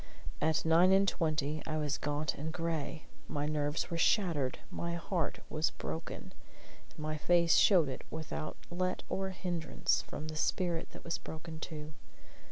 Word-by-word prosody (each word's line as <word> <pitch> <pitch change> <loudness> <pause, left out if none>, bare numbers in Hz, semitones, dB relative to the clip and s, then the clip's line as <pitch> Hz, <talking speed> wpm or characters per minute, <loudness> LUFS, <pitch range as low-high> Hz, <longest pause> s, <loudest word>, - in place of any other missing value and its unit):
At 155 +1 +2
nine 170 +3 +6
and 195 +1 +5
twenty 155 -4 0
I 155 -1 -1
was 150 -2 0
gaunt 150 +1 0
and 155 +3 -4
gray; 165 -2 -2 0.2
my 145 -2 -1
nerves 150 +3 0
were 165 - -1
shattered, 165 - +3
my 170 0 -2
heart 170 -1 -1
was 155 0 +1
broken; 75 +4 -6 0.6
and - - -21
my 155 0 -2
face 170 +1 +4
showed 180 -7 +6
it 130 - -4
without 155 -1 -4
let 185 +1 -1
or 190 0 -1
hindrance 175 -3 0
from 155 - -6
the 155 - -5
spirit 170 +1 0
that - - -10
was 170 - -2
broken 160 0 -7
too. 155 -1 -6
160 Hz, 160 wpm, -33 LUFS, 150-170 Hz, 0.6 s, nine